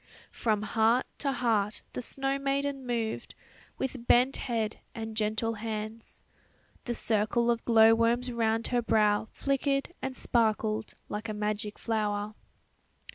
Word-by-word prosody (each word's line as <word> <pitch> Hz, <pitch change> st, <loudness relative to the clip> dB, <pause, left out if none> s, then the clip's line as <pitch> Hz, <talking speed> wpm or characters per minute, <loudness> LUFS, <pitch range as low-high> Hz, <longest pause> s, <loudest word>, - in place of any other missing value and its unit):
From 215 Hz, -3 st, 0 dB
heart 225 Hz, +4 st, +3 dB
to 280 Hz, -, 0 dB
heart 225 Hz, -5 st, 0 dB
the -, -, -3 dB
snow 270 Hz, +2 st, 0 dB
maiden 275 Hz, -1 st, -1 dB
moved, 230 Hz, -2 st, -2 dB, 0.4 s
with 260 Hz, -2 st, -4 dB
bent 255 Hz, +3 st, +4 dB
head 225 Hz, -3 st, -2 dB, 0.2 s
and 220 Hz, -1 st, -5 dB
gentle 220 Hz, +1 st, 0 dB
hands. 220 Hz, 0 st, -6 dB, 0.6 s
The 240 Hz, -, -2 dB
circle 230 Hz, +2 st, +2 dB
of 235 Hz, -1 st, -1 dB
glow 225 Hz, -1 st, +7 dB
worms 235 Hz, +2 st, +2 dB
round 225 Hz, -1 st, 0 dB
her 245 Hz, -1 st, +2 dB
brow 210 Hz, -2 st, +2 dB
flickered 275 Hz, +3 st, 0 dB
and 265 Hz, -1 st, -4 dB
sparkled 220 Hz, -2 st, 0 dB
like 215 Hz, +2 st, -5 dB
a 215 Hz, -, -3 dB
magic 210 Hz, 0 st, -2 dB
flower. 210 Hz, -2 st, -1 dB
225 Hz, 130 wpm, -29 LUFS, 215-245 Hz, 0.6 s, glow